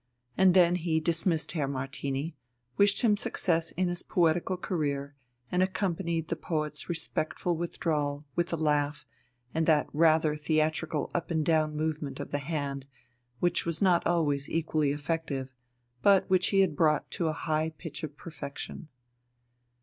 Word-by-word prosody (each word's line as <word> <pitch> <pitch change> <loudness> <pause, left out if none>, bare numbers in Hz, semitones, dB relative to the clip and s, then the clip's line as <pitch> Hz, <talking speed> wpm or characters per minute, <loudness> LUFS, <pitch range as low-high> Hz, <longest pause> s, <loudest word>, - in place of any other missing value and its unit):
And 190 -1 +5
then 175 -1 +5
he 165 -2 0
dismissed 165 0 +1
Herr 150 -4 -1
Martini, 135 +3 -3 0.4
wished 200 - +3
him 215 -3 +5
success 165 -5 0
in 185 +1 0
his 175 0 -1
poetical 175 +2 +1
career, 145 -6 -2 0.4
and 180 - +2
accompanied 170 -4 -1
the 170 - -1
poet's 155 -1 -3
respectful 165 +1 -1
withdrawal 150 -3 -2
with 175 +1 0
a - - +1
laugh 150 -1 0 0.5
and 160 0 0
that 155 -3 +4
rather 155 0 +4
theatrical 155 0 0
up 175 - -2
and 160 -3 0
down 155 -2 +2
movement 150 -2 -2
of 145 - -6
the 145 - 0
hand 140 -2 -3 0.5
which 175 - +2
was 165 -1 -2
not 180 -3 +3
always 145 -5 +1
equally 155 -3 +1
effective, 145 -3 -3 0.5
but 200 -1 +5
which 185 -1 +3
he 195 -1 +4
had 175 -6 +2
brought 150 0 +2
to 170 - -1
a - - +2
high 155 0 -1
pitch 160 -1 -8
of 150 -2 -6
perfection. 150 -1 -7
160 Hz, 150 wpm, -29 LUFS, 150-170 Hz, 0.5 s, And